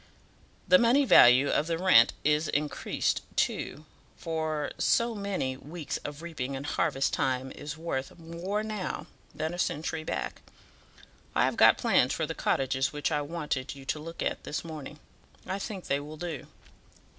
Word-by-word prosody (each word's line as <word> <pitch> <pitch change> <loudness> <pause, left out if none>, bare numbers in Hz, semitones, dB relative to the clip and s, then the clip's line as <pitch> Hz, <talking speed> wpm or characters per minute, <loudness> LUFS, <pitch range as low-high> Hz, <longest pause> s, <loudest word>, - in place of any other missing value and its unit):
The 275 - +7
money 250 +4 +4
value 130 - +7
of 150 - +1
the 165 -1 0
rent 185 +1 +6
is 150 +1 +2
increased, 150 0 -1
too, 150 - -1 0.3
for 160 -3 -2
so 235 0 +2
many 200 -11 -2
weeks 150 +3 -5
of 145 +2 -8
reaping 140 -6 -4
in 135 - -5
harvest 145 -2 0
time 130 0 0
is 150 0 -7
worth 160 -4 -4
more 170 +5 -3
now 215 -4 -4 0.3
than 155 +2 -2
a 175 - -6
century 160 -1 -1
back. - - -4 0.9
I - - +4
have - - 0
got - - +7
plans - - +3
for - - -1
the - - -4
cottages 135 0 0
which 150 +2 -2
I 150 -1 +1
wanted 145 -3 -3
you 135 -1 -12
to 150 - -2
look 165 +2 -6
at - - -2
this 155 - -4
morning; 150 -2 -8 0.5
I 195 - -3
think 195 -2 -6
they 140 - 0
will 150 +2 -8
do." 165 -4 -5
155 Hz, 165 wpm, -29 LUFS, 145-170 Hz, 0.9 s, The